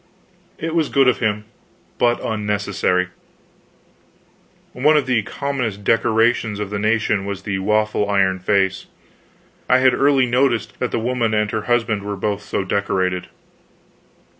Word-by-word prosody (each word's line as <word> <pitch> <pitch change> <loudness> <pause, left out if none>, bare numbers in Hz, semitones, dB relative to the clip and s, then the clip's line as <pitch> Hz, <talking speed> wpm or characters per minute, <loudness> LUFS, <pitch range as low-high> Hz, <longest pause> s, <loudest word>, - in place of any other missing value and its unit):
It 160 0 -4
was 165 -3 +1
good 135 -1 +3
of 125 - +3
him, 105 -2 -1 0.5
but 120 0 +2
unnecessary. 105 -4 -1 1.6
One 150 +5 +3
of 145 - +1
the 125 -3 +1
commonest 120 -4 -4
decorations 115 0 +1
of 105 -1 -4
the 105 - -2
nation 105 -1 +1
was 100 -1 -5
the 95 -2 -2
waffle 105 +1 0
iron 95 -2 +2
face. 95 0 0 0.8
I 125 - +6
had 130 0 +4
early 140 -2 +3
noticed 120 -3 0
that 125 - -1
the - - -2
woman 115 -1 0
and 105 0 0
her 110 -1 -3
husband 115 -3 +1
were 100 0 -5
both 100 +1 -2
so 100 -1 -3
decorated. 95 -2 -1
110 Hz, 140 wpm, -20 LUFS, 100-120 Hz, 1.6 s, I